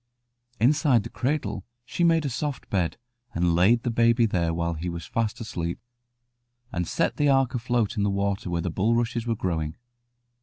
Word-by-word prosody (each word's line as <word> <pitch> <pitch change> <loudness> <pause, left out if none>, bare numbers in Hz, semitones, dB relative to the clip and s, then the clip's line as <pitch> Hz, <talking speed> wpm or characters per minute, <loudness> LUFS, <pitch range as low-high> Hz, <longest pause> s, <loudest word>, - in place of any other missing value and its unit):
Inside 135 -1 +4
the - - -8
cradle 130 -7 -2 0.2
she 175 - -2
made 165 -2 +4
a - - 0
soft 140 +2 -3
bed, 90 -5 0 0.4
and 85 0 +2
laid 100 +8 +4
the 120 - 0
baby 115 0 +4
there 85 -6 0
while 85 0 -1
he 85 +2 -4
was 85 -2 -6
fast 115 +3 -2
asleep, 85 -7 -4 0.9
and 90 -4 -2
set - - 0
the 145 -1 +3
ark 135 -2 +3
afloat 120 -2 0
in - - +1
the 100 - +2
water 100 -1 -1
where 85 -1 -1
the 90 - -2
bulrushes 115 +5 0
were 115 - +1
growing. 80 -6 -2
110 Hz, 180 wpm, -26 LUFS, 90-120 Hz, 0.9 s, Inside